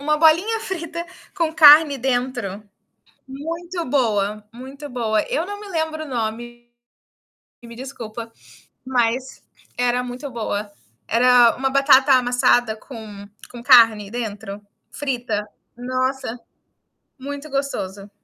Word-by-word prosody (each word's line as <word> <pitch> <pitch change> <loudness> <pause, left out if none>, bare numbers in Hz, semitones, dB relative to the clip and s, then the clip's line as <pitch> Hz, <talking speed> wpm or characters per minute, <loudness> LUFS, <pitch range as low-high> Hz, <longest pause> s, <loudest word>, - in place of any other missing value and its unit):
Uma 300 +2 +1
bolinha 335 +9 +3
frita 340 -5 -5 0.3
com 330 -3 0
carne 300 -2 +7
dentro, 245 -5 -2 0.7
muito 335 +6 -5
boa, 215 -6 0
muito 265 +4 -10
boa. 225 -4 0
Eu 320 - -1
não 410 0 -6
me 415 - -10
lembro 315 -3 -3
o - - -9
nome, 240 0 -5 0.9
me 235 0 -11
desculpa, 230 -3 -8 0.5
mas 255 0 -1 0.4
era 245 0 +1
muito 250 +3 -7
boa. 215 -3 -4 0.4
Era 240 0 +5
uma 270 +1 -1
batata 275 0 +5
amassada 245 -2 +2
com 215 -4 -11 0.2
com 240 -1 -10
carne 225 -5 +5
dentro, 210 -3 -6 0.3
frita. 245 -7 -3 0.3
Nossa, 255 0 -3 0.8
muito 285 +2 -7
gostoso. 205 -8 -4
250 Hz, 110 wpm, -21 LUFS, 230-285 Hz, 0.9 s, carne